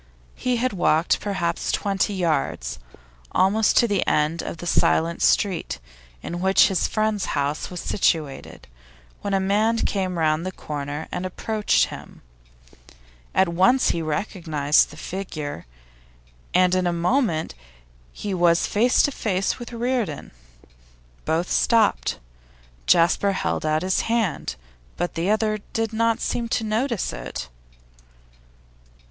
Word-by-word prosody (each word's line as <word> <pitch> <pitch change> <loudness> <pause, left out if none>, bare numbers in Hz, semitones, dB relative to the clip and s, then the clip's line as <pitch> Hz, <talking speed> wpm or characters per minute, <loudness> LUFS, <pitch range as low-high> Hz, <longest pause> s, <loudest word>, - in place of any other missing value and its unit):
He 250 -1 -1
had 245 0 0
walked 170 -3 +2
perhaps 175 -5 -2
twenty 200 0 0
yards, 135 - -1 0.5
almost 205 +4 +3
to 235 - +5
the 205 -4 +1
end 155 +2 +1
of - - -6
the 175 - -8
silent 165 0 +2
street 195 -5 +1 0.5
in 175 - -4
which 190 +2 +5
his 190 - +1
friends' 215 -2 0
house 145 +2 -1
was 180 -1 -6
situated, 155 -8 -1 0.6
when 200 -1 -1
a - - +2
man 210 +4 +2
came 190 -5 -1
round 155 0 +1
the 185 - -3
corner 145 -2 -5
and 180 - -3
approached 210 +3 +1
him. - - -11 1.1
At 190 -2 +4
once 190 +10 +3
he 170 - -2
recognised 155 -3 +1
the 150 - -13
figure, 155 - -6 0.8
and 180 0 +3
in 185 -1 +2
a - - +2
moment 170 - 0 0.6
he 200 - -5
was 175 -2 +3
face 235 +4 +3
to 285 - +2
face 195 -6 -1
with 240 - -8
Reardon. 235 - -2 0.9
Both 165 +3 0
stopped. 225 -3 +2 0.7
Jasper 180 +4 +4
held 155 - -2
out 155 +1 +1
his 185 0 +1
hand, 225 -6 -1 0.4
but 175 - -2
the 170 +3 -1
other 215 0 +1
did 225 0 -1
not 230 0 +1
seem 235 -1 -2
to 225 - 0
notice 225 +1 -1
it. - - -6
185 Hz, 130 wpm, -23 LUFS, 165-215 Hz, 1.1 s, to